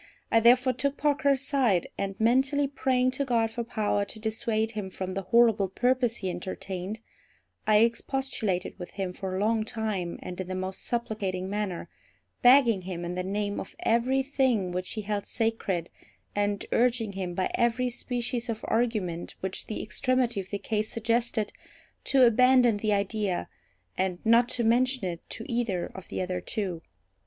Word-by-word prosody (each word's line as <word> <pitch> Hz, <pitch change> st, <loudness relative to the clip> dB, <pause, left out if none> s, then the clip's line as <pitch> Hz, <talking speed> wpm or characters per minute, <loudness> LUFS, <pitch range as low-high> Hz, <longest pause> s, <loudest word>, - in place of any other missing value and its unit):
I 225 Hz, -, +6 dB
therefore 250 Hz, +3 st, +5 dB
took 280 Hz, +3 st, -1 dB
Parker 290 Hz, 0 st, +2 dB
aside; 265 Hz, -, +2 dB
and 195 Hz, 0 st, -4 dB
mentally 265 Hz, +5 st, +3 dB
praying 260 Hz, -2 st, +1 dB
to 265 Hz, +2 st, -1 dB
God 230 Hz, -4 st, +1 dB
for 235 Hz, +1 st, -3 dB
power 210 Hz, -3 st, 0 dB
to 200 Hz, +2 st, -7 dB
dissuade 220 Hz, 0 st, -1 dB
him 210 Hz, -4 st, -4 dB
from 185 Hz, 0 st, -5 dB
the 195 Hz, -, -2 dB
horrible 215 Hz, -1 st, +4 dB
purpose 245 Hz, +3 st, +1 dB
he 190 Hz, -, -3 dB
entertained, 185 Hz, +3 st, -5 dB, 0.7 s
I 215 Hz, 0 st, +6 dB
expostulated 230 Hz, -6 st, -1 dB
with 180 Hz, -, -8 dB
him 190 Hz, -2 st, -3 dB
for 185 Hz, 0 st, -4 dB
a -, -, -1 dB
long 220 Hz, +1 st, +2 dB
time, 215 Hz, -6 st, -3 dB
and 180 Hz, +1 st, -5 dB
in 185 Hz, -, -6 dB
the 185 Hz, -, -3 dB
most 185 Hz, 0 st, -4 dB
supplicating 200 Hz, -6 st, -2 dB
manner, 200 Hz, -5 st, -3 dB, 0.5 s
begging 245 Hz, -5 st, +6 dB
him 175 Hz, -1 st, -5 dB
in 175 Hz, -, -3 dB
the 180 Hz, -, -2 dB
name 205 Hz, +2 st, -2 dB
of -, -, -8 dB
every 255 Hz, +4 st, +2 dB
thing 260 Hz, -9 st, +1 dB
which 180 Hz, +1 st, -3 dB
he 215 Hz, -, -3 dB
held 205 Hz, -1 st, -3 dB
sacred, 225 Hz, -7 st, -1 dB, 0.4 s
and 205 Hz, 0 st, 0 dB
urging 235 Hz, -3 st, +2 dB
him 185 Hz, -3 st, -4 dB
by 185 Hz, -, 0 dB
every 240 Hz, +1 st, +1 dB
species 245 Hz, 0 st, -3 dB
of 225 Hz, -1 st, -3 dB
argument 215 Hz, -8 st, -1 dB
which 190 Hz, 0 st, -4 dB
the 215 Hz, -, -4 dB
extremity 250 Hz, -1 st, 0 dB
of 190 Hz, -, -6 dB
the 200 Hz, -, -2 dB
case 215 Hz, +1 st, -2 dB
suggested, 230 Hz, -1 st, 0 dB, 0.5 s
to 265 Hz, -1 st, +5 dB
abandon 245 Hz, -1 st, +5 dB
the 215 Hz, +1 st, 0 dB
idea, 200 Hz, -2 st, 0 dB, 0.5 s
and 185 Hz, -1 st, 0 dB
not 230 Hz, +2 st, +5 dB
to 240 Hz, -, -1 dB
mention 250 Hz, 0 st, +2 dB
it 170 Hz, -2 st, -5 dB
to 225 Hz, -, -6 dB
either 230 Hz, -7 st, -1 dB
of 190 Hz, -1 st, -10 dB
the -, -, -3 dB
other 180 Hz, 0 st, -3 dB
two. 185 Hz, -5 st, -3 dB
220 Hz, 170 wpm, -28 LUFS, 190-245 Hz, 0.7 s, I